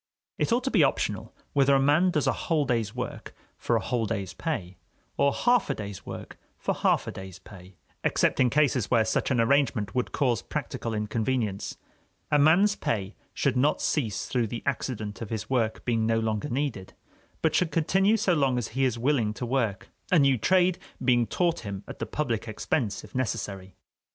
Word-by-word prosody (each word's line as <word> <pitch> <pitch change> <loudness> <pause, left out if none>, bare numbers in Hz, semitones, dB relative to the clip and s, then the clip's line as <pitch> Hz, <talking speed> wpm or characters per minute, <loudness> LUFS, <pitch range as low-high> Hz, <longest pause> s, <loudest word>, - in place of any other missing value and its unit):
It - - +1
ought 245 +2 +2
to 265 - -1
be - - +5
optional - - -1 0.2
whether 140 -1 +4
a - - +4
man 145 +7 +4
does 155 -4 0
a - - +3
whole 155 -3 0
day's 115 -4 -1
work 125 0 -6 0.2
for - - 0
a - - +3
whole 115 -3 -1
day's 100 -4 -3
pay, 95 - -4 0.4
or 140 - +3
half 245 - +2
a - - 0
day's 100 -3 -7
work - - -8 0.2
for - - -1
half - - +1
a - - -4
day's 95 -1 -9
pay, 95 0 -14 0.3
except - - +2
in 125 -2 +5
cases 140 -5 +2
where 115 -3 +3
such - - 0
an 130 -3 +1
arrangement 115 -4 +2
would 125 -1 -1
cause 125 -6 +1
practical 115 -1 -4
inconvenience. 105 -1 -2 0.5
A 150 - +4
man's 180 +8 +5
pay 100 - -2 0.2
should 140 - +1
not 140 +4 +2
cease 115 - -1
through 120 -3 0
the 115 +2 -6
accident 115 -6 -3
of 110 - -5
his 110 +1 -4
work 115 -4 0
being 115 -2 +1
no 115 0 +2
longer 110 +4 -2
needed, 125 -8 -3 0.5
but 160 - +3
should 180 - +2
continue 190 +7 +2
so 195 -4 +2
long 135 -5 +2
as 120 - -2
he 135 +3 0
is 125 -3 0
willing 115 -4 +1
to 125 - -4
work, 115 -6 -1 0.2
a 180 - +6
new 140 -3 +5
trade 180 - +3 0.3
being 120 -2 +3
taught 175 -2 0
him 100 -3 -6
at - - -9
the - - -3
public 120 -7 -2
expense, 110 0 -2
if - - -14
necessary. 100 -6 -3
125 Hz, 195 wpm, -27 LUFS, 110-145 Hz, 0.5 s, a